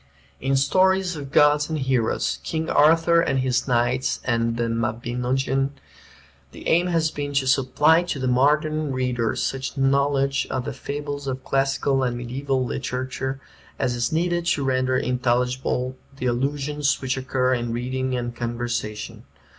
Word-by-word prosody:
In 135 +1 0
"Stories 185 +6 +2
of 140 -3 -7
Gods 150 +1 +4
and 160 - -1
Heroes," 125 - 0
"King 160 - -3
Arthur 165 +2 +5
and 135 -5 0
His 130 0 0
Knights" 125 +1 +1
and 115 -1 0
"The 120 - 0
Mabinogeon" 125 +4 -1 0.8
the - - -9
aim 175 +2 +3
has 165 -3 +1
been 145 -1 -4
to 135 -1 +2
supply 140 +5 +4
to 175 -4 -3
the 130 -1 -2
modern 150 +4 +2
reader 125 -3 -1
such 135 +1 -3
knowledge 140 0 +2
of 130 -1 -2
the - - -4
fables 145 0 -5
of 130 0 -3
classical 135 0 +1
and 125 -2 -1
mediaeval 130 +2 -2
literature 130 +2 -3 0.4
as 125 - 0
is 120 0 -1
needed 175 +1 0
to 145 - +1
render 130 -1 +1
intelligible 125 +1 0 0.2
the 130 - -4
allusions 140 +3 0
which 130 -1 -1
occur 130 -1 0
in 120 -2 -2
reading 130 +2 -2
and 120 -1 -3
conversation. 120 -2 -4
130 Hz, 145 wpm, -23 LUFS, 125-145 Hz, 0.8 s, Arthur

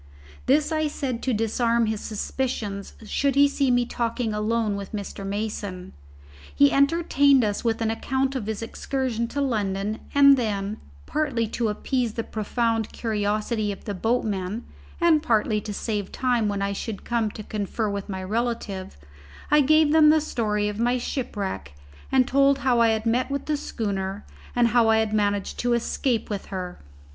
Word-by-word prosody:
This 300 +3 +3
I 310 -1 +1
said 265 -5 -3
to 260 - 0
disarm 230 +1 +1
his 220 -1 -2
suspicions 215 -3 -3
should 275 +4 0
he 285 0 +6
see 280 -1 0
me 245 -1 +3
talking 235 -1 -2
alone 215 0 0
with 200 0 -7
Mr. 200 -1 -5
Mason. 200 -2 -4 0.6
He 285 0 +5
entertained 280 -2 +4
us 205 -1 -1
with 230 -1 0
an 220 - +1
account 265 +4 -1
of 230 -6 -3
his 220 0 -3
excursion 235 -1 -2
to 285 +4 -3
London; 210 -4 -1 0.2
and 280 -1 +8
then, 210 -3 -2 0.3
partly 270 -7 0
to 230 0 -1
appease 235 +2 -1
the 230 - -3
profound 225 +1 -1
curiosity 215 0 -1
of 200 - -9
the 205 - -3
boatmen 210 0 -1 0.4
and 335 -3 +4
partly 220 -6 +1
to 210 - -6
save 205 -1 -3
time 245 -4 +1
when 200 -1 -1
I 200 0 -1
should 205 +1 -5
come 230 -2 0
to 215 - -8
confer 215 +1 -2
with 200 0 -4
my 190 -1 -4
relative, 215 - -3 0.5
I 295 0 +6
gave 310 +2 +4
them 310 -1 +7
the 315 +1 +5
story 210 -8 -1
of 210 +1 -4
my 245 +2 +2
shipwreck, 205 - -4 0.4
and 260 -1 +4
told 275 0 +4
how 245 -2 +4
I 230 - +6
had 220 0 0
met 240 +4 +1
with 280 0 -3
the 305 - 0
schooner 200 -7 -3 0.3
and 240 -1 +4
how 230 0 +4
I 220 - +5
had 220 -1 0
managed 205 -2 0
to 245 0 +1
escape 235 0 0
with 200 -2 -4
her. 180 -2 -5
225 Hz, 170 wpm, -25 LUFS, 210-260 Hz, 0.6 s, and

